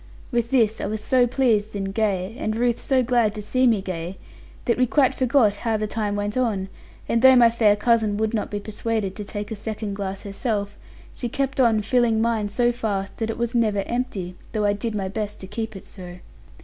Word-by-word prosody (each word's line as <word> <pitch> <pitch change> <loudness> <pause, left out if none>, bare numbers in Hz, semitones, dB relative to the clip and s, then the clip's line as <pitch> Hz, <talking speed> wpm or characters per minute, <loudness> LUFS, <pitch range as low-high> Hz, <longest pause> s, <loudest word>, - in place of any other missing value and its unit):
With 235 -1 0
this 225 -5 +2
I - - -2
was 215 +1 -3
so 255 -2 +3
pleased 225 -5 +1
and 195 -1 -3
gay, 200 -1 -1
and 215 - -1
Ruth 240 0 +1
so 260 -2 +2
glad 235 -3 +2
to 210 - -5
see 255 +4 +2
me 215 -5 +2
gay, 180 0 -5 0.5
that 235 - +1
we 255 - +4
quite 265 0 +3
forgot 245 -5 +3
how 225 0 0
the 215 - -1
time 210 -1 -2
went 205 +1 -2
on; 215 -7 0 0.4
and 230 - +1
though 260 0 +8
my 235 -2 +6
fair 220 -3 +4
cousin 220 -2 +2
would 220 +1 0
not 215 - -1
be 205 - -3
persuaded 215 -1 -3
to 210 - -5
take 205 +1 -6
a - - -2
second 215 0 -4
glass 195 -1 -4
herself, 205 0 -2 0.4
she 240 - -4
kept 270 +2 -2
on 225 -4 +4
filling 230 0 +2
mine 225 -2 0
so 240 +3 +2
fast 205 -5 -3
that 225 -1 -2
it 225 - -3
was 235 0 -2
never 215 -4 +1
empty, 235 -7 -3 0.2
though 215 -2 0
I 205 - +3
did 215 +2 -3
my 195 -2 -2
best 210 +1 -4
to - - -7
keep 220 +2 -5
it 195 - -10
so. 180 -2 -9
220 Hz, 220 wpm, -23 LUFS, 205-235 Hz, 0.5 s, though